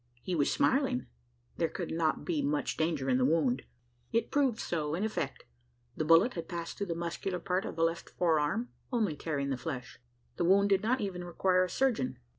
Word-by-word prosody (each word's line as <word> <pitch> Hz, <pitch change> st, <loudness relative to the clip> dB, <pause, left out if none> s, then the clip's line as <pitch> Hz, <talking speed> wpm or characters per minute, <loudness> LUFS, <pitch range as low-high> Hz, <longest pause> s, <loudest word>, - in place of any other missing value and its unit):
He 185 Hz, -, -2 dB
was 150 Hz, -5 st, +2 dB
smiling: -, -, +2 dB, 0.5 s
there -, -, +1 dB
could -, -, -5 dB
not 160 Hz, -1 st, 0 dB
be 330 Hz, -5 st, 0 dB
much 290 Hz, +1 st, 0 dB
danger 155 Hz, -4 st, 0 dB
in 130 Hz, -1 st, +3 dB
the -, -, +3 dB
wound? 135 Hz, -3 st, +2 dB, 0.5 s
It 230 Hz, -, 0 dB
proved 270 Hz, -5 st, +2 dB
so 155 Hz, -7 st, -2 dB
in 185 Hz, -, -2 dB
effect. 185 Hz, -11 st, -3 dB, 0.5 s
The -, -, -1 dB
bullet 165 Hz, +9 st, +5 dB
had 170 Hz, -, -6 dB
passed 170 Hz, -2 st, -4 dB
through 200 Hz, -, -2 dB
the 170 Hz, -, -2 dB
muscular 170 Hz, +2 st, -3 dB
part 180 Hz, +2 st, -1 dB
of -, -, -5 dB
the 165 Hz, -, +1 dB
left 165 Hz, 0 st, -1 dB
forearm 165 Hz, +7 st, +1 dB, 0.2 s
only 215 Hz, -, +1 dB
tearing 140 Hz, -2 st, -2 dB
the 130 Hz, -, -1 dB
flesh. 125 Hz, -2 st, -6 dB, 0.4 s
The 175 Hz, -, +1 dB
wound 200 Hz, +3 st, +5 dB
did 195 Hz, -1 st, +4 dB
not 245 Hz, +5 st, +1 dB
even 185 Hz, -3 st, -3 dB
require 185 Hz, +1 st, +2 dB
a 185 Hz, -, -2 dB
surgeon. 215 Hz, -, 0 dB
170 Hz, 200 wpm, -31 LUFS, 155-200 Hz, 0.5 s, bullet